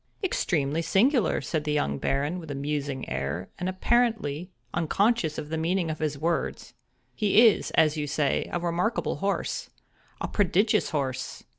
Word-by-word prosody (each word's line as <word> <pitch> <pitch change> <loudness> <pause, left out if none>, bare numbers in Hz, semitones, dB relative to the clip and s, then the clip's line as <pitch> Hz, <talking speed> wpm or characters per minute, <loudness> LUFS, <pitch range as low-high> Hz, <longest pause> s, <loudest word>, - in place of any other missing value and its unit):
"Extremely 160 - 0
singular!" 230 - +2
said 150 +3 -2
the 150 0 -1
young 70 - 0
Baron, 145 +6 -1
with 160 -3 -10
a 145 - -3
musing 140 -1 -3
air, 70 +7 -3
and 180 - -1
apparently 185 -6 +1 0.2
unconscious 175 0 +1
of 150 - -5
the 160 0 -2
meaning 170 0 0
of 155 - -6
his 150 -2 -1
words. 165 +4 -2 0.4
"He 215 +2 +5
is, 215 - +2
as 155 -1 +4
you 150 -1 -2
say, 145 -1 0
a 175 - -1
remarkable 175 +6 -1
horse—a 200 0 -4
prodigious 205 +2 +2
horse! 130 -4 -3
160 Hz, 150 wpm, -27 LUFS, 145-195 Hz, 0.4 s, He